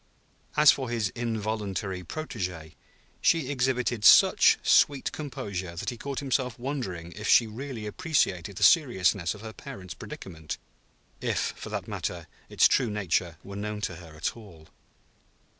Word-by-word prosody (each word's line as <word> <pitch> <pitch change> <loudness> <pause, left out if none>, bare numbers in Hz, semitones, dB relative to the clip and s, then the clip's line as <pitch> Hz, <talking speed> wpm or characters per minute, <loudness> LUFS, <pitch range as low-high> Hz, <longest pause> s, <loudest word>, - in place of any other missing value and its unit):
As 150 -1 +8
for 130 -3 -3
his 115 -4 0
involuntary 105 -5 -3
protégée, 90 - -5 0.5
she 155 -5 +2
exhibited 125 -4 0
such - - +7
sweet 140 -2 +4
composure 100 - -5
that 90 - -3
he 120 - -8
caught 140 +3 -5
himself 130 -3 -1
wondering 120 - -4
if 105 +3 -6
she 120 - +6
really 115 0 -6
appreciated 100 - 0
the - - -2
seriousness 100 - +4
of 105 - -12
her 110 0 -8
parent's 95 - -9
predicament; 80 +1 -8 0.6
if, - - -1
for - - -8
that - - -4
matter, - - -4 0.2
its - - +5
true 125 -4 +2
nature 90 -5 -1
were 100 - -9
known 105 +1 -4
to 85 -5 -3
her 85 -3 -12
at 75 - -2
all. 90 -9 -14
105 Hz, 145 wpm, -27 LUFS, 90-130 Hz, 0.6 s, As